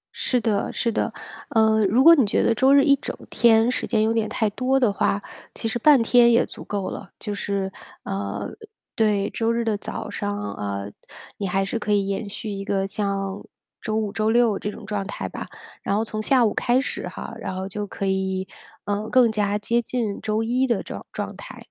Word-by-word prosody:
是 250 Hz, -, +1 dB
的 215 Hz, -2 st, 0 dB
是 235 Hz, -, -1 dB
的。 -, -, -1 dB, 0.4 s
呃， 220 Hz, -1 st, +3 dB
如 230 Hz, +7 st, +3 dB
果 335 Hz, -, +10 dB
你 270 Hz, -7 st, +4 dB
觉 200 Hz, -, +1 dB
得 230 Hz, -, +3 dB
周 265 Hz, +4 st, +4 dB
日 280 Hz, 0 st, +6 dB
一 280 Hz, -1 st, +5 dB
整 280 Hz, -, -6 dB
天 225 Hz, 0 st, +4 dB
时 -, -, -2 dB
间 220 Hz, -2 st, +2 dB
有 220 Hz, +1 st, +2 dB
点 225 Hz, -1 st, 0 dB
太 220 Hz, -, 0 dB
多 255 Hz, +5 st, +1 dB
的 240 Hz, -6 st, +2 dB
话， 205 Hz, 0 st, 0 dB, 0.3 s
其 225 Hz, -, -3 dB
实 225 Hz, -, -1 dB
半 285 Hz, 0 st, +6 dB
天 235 Hz, +1 st, +5 dB
也 235 Hz, +1 st, +4 dB
足 -, -, -10 dB
够 200 Hz, -2 st, -3 dB
了。 -, -, -8 dB
就 210 Hz, -, -4 dB
是 200 Hz, -1 st, -2 dB, 0.3 s
呃， 100 Hz, +1 st, -3 dB, 0.5 s
对， 210 Hz, -3 st, +2 dB
周 225 Hz, 0 st, 0 dB
日 230 Hz, 0 st, 0 dB
的 220 Hz, -2 st, +1 dB
早 210 Hz, -, -6 dB
上， 205 Hz, 0 st, -3 dB
呃 100 Hz, -1 st, -4 dB, 0.5 s
你 200 Hz, -, -2 dB
还 195 Hz, +2 st, 0 dB
是 225 Hz, +4 st, -2 dB
可 210 Hz, -1 st, -2 dB
以 200 Hz, -1 st, +2 dB
延 200 Hz, +1 st, -3 dB
续 210 Hz, +1 st, -4 dB
一 195 Hz, 0 st, -4 dB
个 195 Hz, -1 st, 0 dB
像 195 Hz, -1 st, -3 dB, 0.4 s
周 215 Hz, -, -2 dB
五、 215 Hz, -2 st, -1 dB
周 215 Hz, 0 st, +1 dB
六 230 Hz, -3 st, +3 dB
这 210 Hz, -, -3 dB
种 -, -, -11 dB
状 205 Hz, -2 st, -3 dB
态 -, -, -4 dB
吧。 -, -, -7 dB, 0.3 s
然 200 Hz, -, -1 dB
后 215 Hz, -, +1 dB
从 215 Hz, -1 st, -4 dB
下 250 Hz, +1 st, +4 dB
午 215 Hz, -, +1 dB
开 245 Hz, +1 st, +2 dB
始 270 Hz, -, -3 dB
哈， -, -, -7 dB
然 185 Hz, -, -4 dB
后 190 Hz, 0 st, -4 dB
就 205 Hz, +2 st, -4 dB
可 195 Hz, -, -5 dB
以， 190 Hz, 0 st, -1 dB, 0.4 s
嗯， 205 Hz, +2 st, -2 dB
更 240 Hz, 0 st, +5 dB
加 205 Hz, -1 st, 0 dB
接 230 Hz, +3 st, 0 dB
近 230 Hz, -4 st, -3 dB
周 215 Hz, +1 st, 0 dB
一 250 Hz, +3 st, +1 dB
的 235 Hz, -5 st, 0 dB
这 -, -, -8 dB
种 -, -, -8 dB
状 -, -, -5 dB
态。 -, -, -10 dB
215 Hz, 235 characters per minute, -23 LUFS, 200-235 Hz, 0.5 s, 果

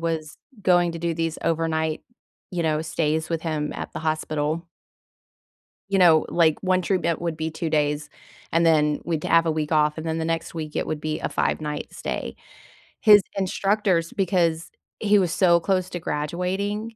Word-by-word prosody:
was 160 Hz, -2 st, -3 dB, 0.2 s
going 175 Hz, -2 st, +3 dB
to 165 Hz, -, -6 dB
do 170 Hz, 0 st, -1 dB
these 165 Hz, 0 st, -2 dB
overnight, 160 Hz, -1 st, 0 dB, 0.5 s
you 175 Hz, -3 st, -2 dB
know, 155 Hz, -1 st, +1 dB
stays 160 Hz, -1 st, -1 dB
with 165 Hz, -1 st, -2 dB
him 155 Hz, -2 st, -2 dB
at -, -, -6 dB
the -, -, -5 dB
hospital 155 Hz, +1 st, -2 dB, 1.2 s
you 195 Hz, -1 st, +2 dB
know, 165 Hz, -4 st, +6 dB
like, 160 Hz, -3 st, +3 dB
1 185 Hz, -1 st, +2 dB
treatment 170 Hz, -3 st, 0 dB
would 165 Hz, -2 st, -2 dB
be 160 Hz, 0 st, -3 dB
2 160 Hz, 0 st, -4 dB
days, 150 Hz, -1 st, 0 dB, 0.4 s
and 165 Hz, +1 st, +3 dB
then 150 Hz, -2 st, +3 dB
we'd 160 Hz, -3 st, -2 dB
have 165 Hz, 0 st, +4 dB
a -, -, +2 dB
week 155 Hz, 0 st, -2 dB
off, 150 Hz, 0 st, +3 dB
and 160 Hz, -, -5 dB
then 160 Hz, 0 st, -1 dB
the 160 Hz, -, -2 dB
next 165 Hz, 0 st, -2 dB
week, 155 Hz, -2 st, -5 dB
it -, -, -1 dB
would 155 Hz, -, -3 dB
be 155 Hz, 0 st, -2 dB
a -, -, -2 dB
five-night 150 Hz, -1 st, -2 dB
stay. -, -, -5 dB, 0.6 s
His 210 Hz, -2 st, +7 dB, 0.2 s
instructors 195 Hz, -2 st, 0 dB
because 170 Hz, -4 st, +1 dB, 0.3 s
he 210 Hz, -1 st, +4 dB
was 175 Hz, -3 st, +1 dB
so 170 Hz, -1 st, +4 dB
close 185 Hz, 0 st, 0 dB
to 175 Hz, -, -4 dB
graduating, 190 Hz, +9 st, -3 dB
165 Hz, 175 wpm, -24 LUFS, 155-175 Hz, 1.2 s, His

